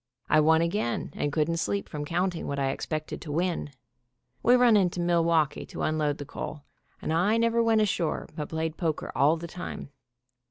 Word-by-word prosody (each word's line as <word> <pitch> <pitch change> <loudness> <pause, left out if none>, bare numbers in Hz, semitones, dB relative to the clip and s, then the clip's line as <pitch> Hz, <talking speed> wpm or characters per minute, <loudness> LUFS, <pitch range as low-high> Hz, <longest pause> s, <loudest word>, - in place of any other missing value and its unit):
I - - +6
won 160 +2 +4
again, 170 - -1
and 145 - -1
couldn't 155 +2 0
sleep 200 +4 -1
from 150 -2 -5
counting 175 +2 -1
what 140 - -3
I 135 -1 +1
expected 155 +2 -4
to 150 - -6
win. 170 0 -1 0.7
We 245 - +5
run 245 -3 +5
into 180 -3 +2
Milwaukee 170 -3 +2
to - - -5
unload 155 -2 0
the 145 - -7
coal, 145 +1 -6 0.4
and 155 - -1
I 195 +7 +3
never 230 0 +2
went 225 -1 +3
ashore, 185 -6 0
but 150 -3 -4
played 160 0 -3
poker 160 -3 -2
all 150 +4 +3
the 165 - -7
time. 170 -4 -7
165 Hz, 185 wpm, -27 LUFS, 150-180 Hz, 0.7 s, I